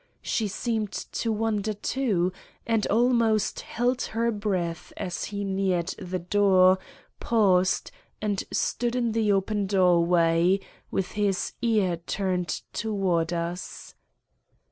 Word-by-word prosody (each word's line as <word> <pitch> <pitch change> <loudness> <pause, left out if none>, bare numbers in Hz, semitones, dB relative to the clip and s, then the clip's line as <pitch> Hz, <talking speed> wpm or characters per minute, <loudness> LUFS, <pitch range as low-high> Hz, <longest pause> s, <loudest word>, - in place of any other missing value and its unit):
She 220 - 0
seemed 215 0 -2
to 230 - -3
wonder 215 -1 0
too, 205 -5 0 0.3
and 225 -2 +1
almost 230 -2 +2
held 245 +2 -1 0.2
her 235 +1 +2
breath 185 -6 -2
as 180 -2 -3
he 205 -1 -4
neared 190 -3 0
the 185 -1 -3
door, 185 0 +4 0.4
paused, 190 -5 +2 0.3
and 205 -2 -1
stood 240 0 0
in 240 -2 +1
the 220 -2 +2
open 200 +1 0
doorway, 175 -1 +3 0.3
with 195 - -2
his 200 -3 -1
ear 210 -7 +2
turned 180 +1 -2 0.3
towards 190 -7 0
us. 170 +2 -5
200 Hz, 115 wpm, -26 LUFS, 180-220 Hz, 0.4 s, door